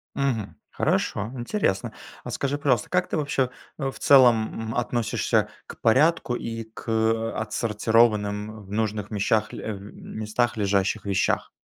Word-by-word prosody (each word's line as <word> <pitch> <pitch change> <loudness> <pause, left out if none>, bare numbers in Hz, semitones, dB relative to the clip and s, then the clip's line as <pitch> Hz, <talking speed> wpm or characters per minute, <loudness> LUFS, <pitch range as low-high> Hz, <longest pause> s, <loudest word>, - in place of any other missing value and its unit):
Мгм, 115 - -1 0.2
хорошо, 105 +3 0
интересно. 120 - -1 0.3
А - - -6
скажи, 140 +1 -1
пожалуйста, 135 -6 +1
как 180 0 +1
ты - - -1
вообще, 140 -4 0 0.3
э, 135 -3 -1
в - - -13
целом, 115 -4 +4
м, - - -5
относишься 120 -1 0 0.2
к - - -11
порядку 130 +2 +3
и 115 -1 -4
к, 110 0 -13
э, 110 0 +1
отсортированным 110 -1 +1
в 100 - -14
нужных 105 -1 -1
вещах, 105 +1 +1
э, 110 - -4
местах 110 +4 -3
лежащих 100 0 +1
вещах? 100 -1 0
110 Hz, 140 wpm, -25 LUFS, 105-125 Hz, 0.3 s, целом